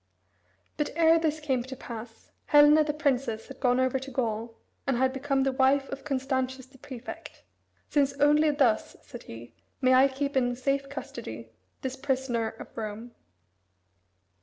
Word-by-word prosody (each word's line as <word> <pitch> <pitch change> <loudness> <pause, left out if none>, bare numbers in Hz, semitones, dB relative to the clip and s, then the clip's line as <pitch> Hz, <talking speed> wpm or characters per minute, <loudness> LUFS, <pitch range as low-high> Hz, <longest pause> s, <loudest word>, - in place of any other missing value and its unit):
But 295 - 0
ere 330 0 +5
this 315 -1 0
came 270 -5 0
to 260 +2 -7
pass, 230 -2 -10 0.2
Helena 295 +1 +7
the 300 - -1
princess 270 -7 -1
had - - -10
gone 250 -1 +2
over 260 0 +1
to 265 +1 -8
Gaul, 230 -3 -3 0.3
and 265 -3 +1
had 260 +1 +2
become 270 0 0
the 270 - +1
wife 270 +1 +2
of 275 0 -6
Constantius 260 -1 -2
the 265 0 -20
prefect, 255 -3 -9 0.4
"Since 280 -2 +2
only 295 +2 +4
thus," 270 -7 +1
said 240 - -10
he, 115 +1 -10 0.3
"may 255 -1 +4
I 260 +2 +7
keep 275 +1 -3
in 245 -2 +2
safe 275 +2 -1
custody 280 - -8 0.3
this 260 -1 -3
prisoner 260 -4 -1
of - - -11
Rome." 220 +2 -6
265 Hz, 160 wpm, -28 LUFS, 245-280 Hz, 0.4 s, Helena